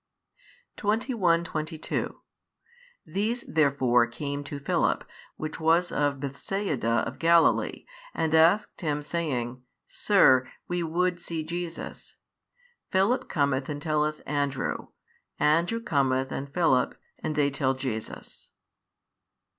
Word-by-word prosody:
21, 205 -5 +1
22 155 -1 -4 0.8
These 225 +5 -1
therefore 130 -6 +3
came 140 +4 -4
to 145 - -5
Philip 140 - 0 0.3
which 155 -1 -5
was 165 +2 +3
of 145 -1 0
Bethsaida 140 - -1
of - - -7
Galilee, 170 0 +3 0.3
and 160 - -1
asked 165 +8 +4
him, 150 -3 -1
saying, 130 -6 -2 0.2
Sir, 130 -11 +4 0.2
we 175 0 -1
would 175 +2 0
see 165 -2 -4
Jesus. 170 +1 -6 0.7
Philip 195 +7 +2
cometh 140 -3 0
and 145 -1 -3
telleth 150 0 0
Andrew: 140 -2 -2 0.5
Andrew 170 +9 +2
cometh 135 - +1
and 140 +1 -5
Philip, 140 -6 +2 0.2
and 155 - -3
they 145 -1 +2
tell 135 -1 0
Jesus. 125 -5 -6
155 Hz, 105 wpm, -27 LUFS, 140-170 Hz, 0.8 s, asked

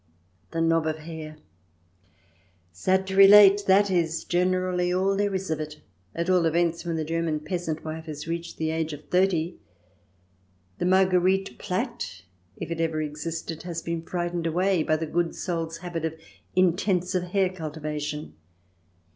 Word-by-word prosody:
The 165 - -2
knob 165 -1 +2
of 155 0 -1
hair 155 -1 -8
I - - -27 1.3
Sad 185 - +1
to 190 0 -4
relate, 200 +1 +8
that 195 +1 +5
is 165 -2 0
generally 180 0 +1
all 190 +2 +2
there 200 0 0
is 190 -3 -3
of 155 - -1
it, 155 0 -6 0.4
at 170 +1 -2
all 180 -3 +3
events 170 +1 +1
when 170 -2 -2
the 160 -1 -2
German 165 -1 -1
peasant 165 -2 -3
wife 160 +1 -5
has 150 0 -6
reached 170 +1 -4
the 160 0 -1
age 160 -1 -2
of 150 0 -11
thirty. 180 -2 +1 1.2
The - - 0
Marguerite 190 +1 +3
plait, 235 - -4 0.3
if - - -6
it 165 0 -2
ever 160 -1 0
existed, 155 +1 -4
has 170 -1 -5
been 170 -1 -3
frightened 175 0 -2
away 180 +2 +2
by 155 - +2
the 160 +1 -2
good 170 +2 -1
soul's 165 -2 -3
habit 170 -2 -5
of 160 0 -3 0.4
intensive 180 0 +2
hair 190 +1 +1
cultivation. 150 -3 -5
170 Hz, 155 wpm, -26 LUFS, 160-185 Hz, 1.3 s, relate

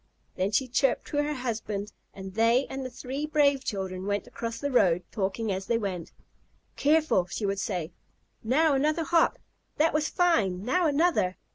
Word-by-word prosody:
Then 190 +1 -1
she 255 +5 +1
chirped 255 +2 +1
to 290 - -3
her 295 +1 0
husband, 215 -5 -4 0.2
and 190 -1 -9
they 230 +5 +3
and 270 0 -4
the 255 - -4
three 270 +4 -5
brave 285 -3 +3
children 190 -3 -4
went 205 0 -1
across 230 0 -5
the 285 +3 -3
road, 180 -8 +3
talking 205 +2 -2
as 190 0 -3
they 230 - +2
went. 190 -6 -4 0.6
"Careful!" 300 - +2
she 205 +3 -4
would 195 0 -1
say. 180 -5 -3 0.5
"Now 290 +7 +3
another 305 +4 +1
hop! 330 +1 +3 0.4
That 315 +2 +3
was 305 0 +1
fine! 210 - +1
Now 330 +8 +2
another!" 290 - +2
235 Hz, 170 wpm, -27 LUFS, 195-290 Hz, 0.6 s, they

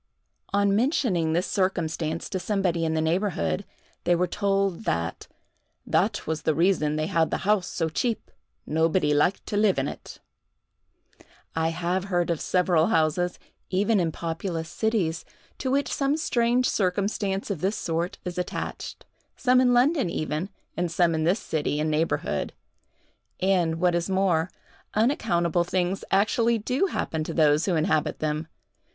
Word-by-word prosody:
On 200 0 +3
mentioning 210 - +1
this 175 +3 +1
circumstance 165 -4 -1
to 190 - -2
somebody 180 -3 0
in 160 0 0
the 160 - +1
neighborhood, 160 - 0 0.4
they 175 0 +3
were 180 +1 +2
told 195 +1 0
that 85 0 -2 0.6
"that - - +1
was 160 0 -2
the 155 - +1
reason 160 -3 +2
they 155 0 0
had 165 0 +1
the - - -3
house 205 -3 +2
so 165 - -1
cheap: 225 +8 -2 0.3
nobody 160 0 +2
liked 165 +6 +2
to 205 - -2
live 210 -2 +3
in 135 +1 0
it." - - -8 1.4
I 160 0 +1
have 180 +3 -1
heard 175 -3 0
of 165 - -2
several 180 -3 +2
houses, 175 -3 +1 0.3
even 200 +3 +2
in 165 -2 +1
populous 165 0 -4
cities, 195 -8 0 0.4
to 260 - -2
which 280 +2 +1
some 280 +2 +1
strange 245 -4 +2
circumstance 195 +1 -1
of 175 -6 -4
this 195 +3 0
sort 170 +2 -2
is 180 0 -4
attached—some 250 +7 -2
in 250 -1 +4
London 255 - +3
even, 155 +2 -2 0.3
and 175 -1 -1
some 170 -1 +3
in 160 0 0
this 180 +5 +3
city 150 -1 -2
and 155 +1 0
neighborhood; 155 +2 -1 0.9
and, 180 -4 +2
what 180 0 +3
is 170 +2 -1
more, 185 -3 +2 0.5
unaccountable 175 - +2
things 180 +2 -1
actually 225 +4 +3
do 250 - 0
happen 160 - -2
to 160 - -5
those 155 -1 +4
who 180 - +2
inhabit 155 -1 +1
them. 155 +1 -2
180 Hz, 150 wpm, -26 LUFS, 160-200 Hz, 1.4 s, in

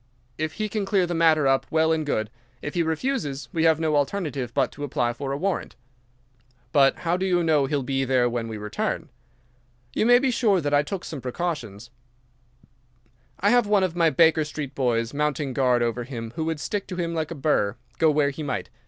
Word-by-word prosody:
If 155 0 -2
he 215 -1 -2
can 210 0 -2
clear 195 -2 +2
the 175 - -3
matter 160 -3 +4
up, 135 0 +2
well 160 0 +2
and 160 -1 +1
good. 110 -7 -2 0.3
If 150 - -4
he 175 - +1
refuses, 160 - -2
we 165 -1 +1
have 160 -1 +4
no 160 -2 +1
alternative 145 - -1
but - - +1
to 145 - -8
apply 120 -3 0
for 135 +2 -5
a 140 - -1
warrant." 190 +4 -2 1.0
"But 140 -3 +5
how 170 +2 +2
do 190 - -1
you 175 -2 +2
know 150 -4 +3
he'll 140 -1 -1
be 135 +1 -1
there 130 -2 +2
when 120 -1 -2
we 110 -1 -5
return?" 105 0 -3 0.8
"You 220 - +1
may 245 0 +8
be 260 +1 +1
sure 215 -6 +2
that 145 -3 -2
I 145 - +5
took 185 +5 -5
some 145 -4 -6
precautions. 120 - -4 1.5
I 200 - +4
have 245 -3 +4
one 205 -2 +3
of 180 -2 -1
my 165 -2 +4
Baker 160 -1 +4
Street 150 -2 -6
boys 120 -3 0
mounting 145 -2 -1
guard 125 -2 +2
over 120 +1 -1
him 115 -2 -7
who 160 -1 -2
would 160 -1 -2
stick 200 +6 -3
to 180 - -5
him 170 -1 -2
like 160 -2 -2
a 170 - -5
burr, 135 -8 +1 0.2
go 160 - +5
where 145 -2 +2
he 140 - -8
might. 145 -3 -4
150 Hz, 215 wpm, -25 LUFS, 135-170 Hz, 1.5 s, may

